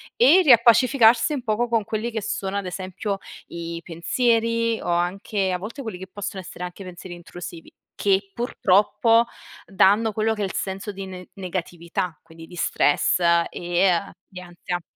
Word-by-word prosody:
e 300 +10 +6
riappacificarsi 240 +1 +5
un 270 -4 -3
poco 230 +2 0
con 230 -2 +1
quelli 220 +3 -3
che 220 -1 -3
sono, 195 0 -3
ad 200 - -3
esempio, 190 +2 -4 0.3
i 170 0 -6
pensieri 230 +7 0
o - - -7
anche, 185 +3 -1
a 180 - 0
volte, 225 +9 -7
quelli 220 -7 -6
che 190 +1 -9
possono 200 +1 -6
essere 180 0 -9
anche 180 +2 -7
pensieri 180 0 -9
intrusivi, 175 -1 -10 0.2
che 195 0 +1
purtroppo, 230 0 +3 0.4
danno 205 +3 +3
quello 220 +1 +1
che 210 - -5
è - - +1
il 190 - -5
senso 195 +2 -4
di 195 0 -7
ne 185 -1 -9
negatività, 180 -1 -4
quindi 165 0 -13
di 175 - -12
stress, 155 -1 +2 0.3
e 175 +2 +1
a 170 -2 -1
di 185 - -10
ansia. 175 0 -5
195 Hz, 165 wpm, -23 LUFS, 180-225 Hz, 0.4 s, e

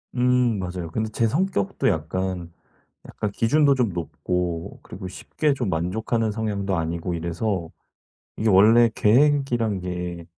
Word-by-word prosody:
음 125 -2 +2
맞아요. 90 -2 -4
근데 110 +4 -2
제 115 +1 +1
성격도 150 - 0
약간, 85 +2 -2 0.6
약간 105 - -3
기준도 140 +7 +3
좀 125 -4 +1
높고 85 +1 -3
그리고 95 - -8
쉽게 145 +10 -1
좀 125 -7 -2
만족하는 110 +7 -1
성향도 100 -3 -2
아니고 85 +1 -2
이래서 85 +1 -2 0.7
이게 110 - +1
원래 110 +5 +6
계획이란 120 -3 +2
게 90 -1 -5
100 Hz, 275 characters per minute, -24 LUFS, 90-115 Hz, 0.7 s, 원래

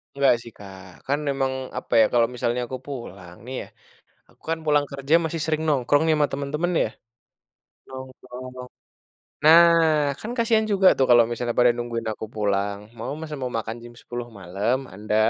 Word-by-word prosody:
Enggak 140 -3 +4
sih, 115 - -11
Kak, 95 -2 -11 0.2
kan 140 +2 +1
memang, 135 -1 0 0.3
apa - - -11
ya, - - +7
kalau 120 -1 +4
misalnya 120 0 -1
aku 130 +1 -6
pulang 95 -10 -8
nih 130 - -6
ya, - - -11 0.6
aku - - -29
kan 165 - 0
pulang 145 -1 +3
kerja 140 +3 0
masih 160 0 -3
sering 155 0 -1
nongkrong 145 0 +2
nih, 160 - +4
sama 150 - +3
temen-temen, 145 +5 -2
ya. - - -2 1.0
Nongkrong. 130 -1 -10 0.9
Nah, 165 +2 +9 0.6
kan 220 - -6
kasihan 225 -1 +2
juga 195 -1 +3
tuh 130 - +3
kalau 120 -1 +8
misalnya 120 0 -2
pada 125 0 +6
nungguin 115 -1 -4
aku 110 - -7
pulang. 100 -1 -1 0.2
Mau 120 +4 -4
masa 155 -2 -6
mau 125 - -2
makan 115 0 -5
jam 120 0 -12
10:00 120 0 -6
malam, 100 +7 -1 0.2
anda? 105 +2 -4
130 Hz, 175 wpm, -24 LUFS, 115-145 Hz, 1.0 s, Nah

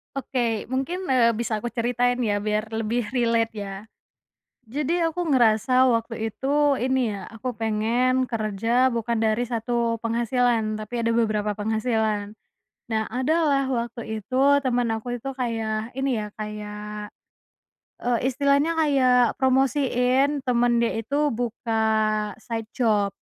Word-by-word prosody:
Oke, 240 -6 -2
mungkin, 330 +9 -3
eee, 240 -3 +4
bisa 220 -1 -3
aku 240 - -3
ceritain 245 +1 0
ya 210 -4 +1
biar 215 +1 -1
lebih 225 +1 -1
relate 230 -2 +1
ya. 200 +1 -6 0.8
Jadi 300 +6 -1
aku 335 +1 -1
ngerasa 250 +2 +4
waktu 230 -1 -1
itu 280 +4 +1
ini 255 -1 +1
ya 200 -1 -6
aku 230 +3 -5
pengen 230 +4 +1
kerja 230 +3 +1
bukan 235 0 -1
dari 220 +1 +1
1 235 0 -1
penghasilan 230 -1 0
tapi 235 +3 -4
ada 230 - +1
beberapa 215 -2 +1
penghasilan. 220 -1 -1 0.5
nah 220 -1 -2
ada 260 +6 0 0.2
lah 275 -1 +2
waktu 235 -3 -3
itu 255 +5 -4 0.2
teman 245 -2 +1
aku 245 +2 -4
itu 270 +3 -6
kayak 225 -3 -2
ini 265 -4 0
ya 210 - -5
kayak, 210 0 -6 1.0
eee, 240 -1 +2
istilahnya 280 +4 +2
kayak 255 -5 +3
promosiin 265 +1 +2
teman 240 -1 +2
dia 235 - +1
itu 285 +6 0
buka 240 0 -4 0.8
side 225 -2 -4
job. 210 -5 +2
235 Hz, 130 wpm, -24 LUFS, 220-255 Hz, 1.0 s, eee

